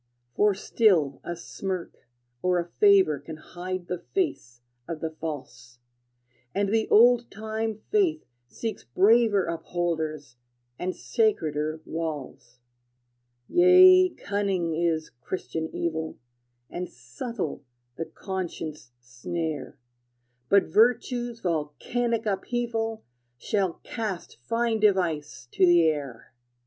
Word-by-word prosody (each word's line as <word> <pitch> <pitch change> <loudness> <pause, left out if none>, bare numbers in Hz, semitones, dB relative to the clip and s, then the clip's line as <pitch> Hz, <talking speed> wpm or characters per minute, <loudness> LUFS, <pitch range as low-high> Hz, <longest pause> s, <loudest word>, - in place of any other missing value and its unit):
For 205 -1 +3
still 175 - +2
a 175 - -4
smirk 180 -4 -6 0.3
or 180 0 +2
a 170 - 0
favor 195 -8 +5
Can 155 +2 -9
hide 180 +2 -6
the 180 0 -4
face 170 - -3 0.3
of 165 -2 -4
the 160 0 -3
false; 130 -6 -7 0.8
And 200 0 +1
the 220 +1 +1
old 240 +2 +6
time 220 0 -4
Faith 365 -7 +2 0.2
seeks 225 - -5
braver 205 - +4
Upholders, 160 -5 -3 0.4
and 185 +1 -2
sacreder 155 - 0
walls. 150 -6 -5 0.9
Yea, 370 +1 +7
cunning 195 -4 -1
is 160 -1 0
Christian 160 +2 -4
evil, 160 -1 -3 0.5
And 180 +1 -5
subtle 150 - -6 0.3
the 165 - -4
conscience' 160 - -6
snare; 150 +6 -5 0.7
But 200 -1 +6
virtue's 240 +4 +1
volcanic 215 +9 -1
upheaval 225 +2 -2 0.3
Shall 190 - 0
cast 215 -7 -5
fine 230 - 0
device 175 - +1
to - - +1
the 175 -2 +6
air! 140 -6 -2
180 Hz, 105 wpm, -26 LUFS, 155-220 Hz, 0.9 s, Yea